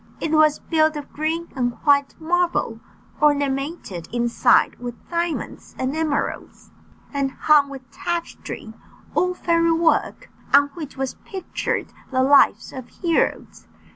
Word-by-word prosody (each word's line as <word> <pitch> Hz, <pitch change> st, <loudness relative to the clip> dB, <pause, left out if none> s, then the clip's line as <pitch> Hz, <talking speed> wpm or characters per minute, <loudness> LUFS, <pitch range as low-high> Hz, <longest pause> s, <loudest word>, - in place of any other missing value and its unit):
It 315 Hz, -, -2 dB
was 310 Hz, -1 st, +4 dB
built 315 Hz, -1 st, +1 dB
of 295 Hz, -1 st, -7 dB
green 320 Hz, +3 st, -2 dB
and 245 Hz, -2 st, 0 dB
white 280 Hz, -1 st, +3 dB
marble, 335 Hz, -8 st, 0 dB, 0.4 s
ornamented 280 Hz, -, 0 dB
inside 235 Hz, 0 st, +3 dB
with 245 Hz, -1 st, -6 dB, 0.2 s
diamonds 340 Hz, -1 st, -3 dB
and 260 Hz, +3 st, -2 dB
emeralds, 315 Hz, -3 st, -3 dB, 0.4 s
and 275 Hz, -1 st, 0 dB
hung 295 Hz, -2 st, +4 dB
with 265 Hz, -2 st, -10 dB
tapestry 335 Hz, -8 st, -5 dB, 0.4 s
all 360 Hz, 0 st, +1 dB
fairy 335 Hz, -1 st, +2 dB
work 330 Hz, 0 st, +1 dB, 0.2 s
on 285 Hz, 0 st, +5 dB
which 300 Hz, -3 st, -9 dB
was 265 Hz, -1 st, -3 dB
pictured 380 Hz, -3 st, -4 dB, 0.2 s
the 260 Hz, -1 st, +1 dB
lives 280 Hz, +1 st, +4 dB
of 260 Hz, -2 st, -8 dB
heroes. 340 Hz, -3 st, -1 dB
295 Hz, 125 wpm, -22 LUFS, 270-330 Hz, 0.4 s, on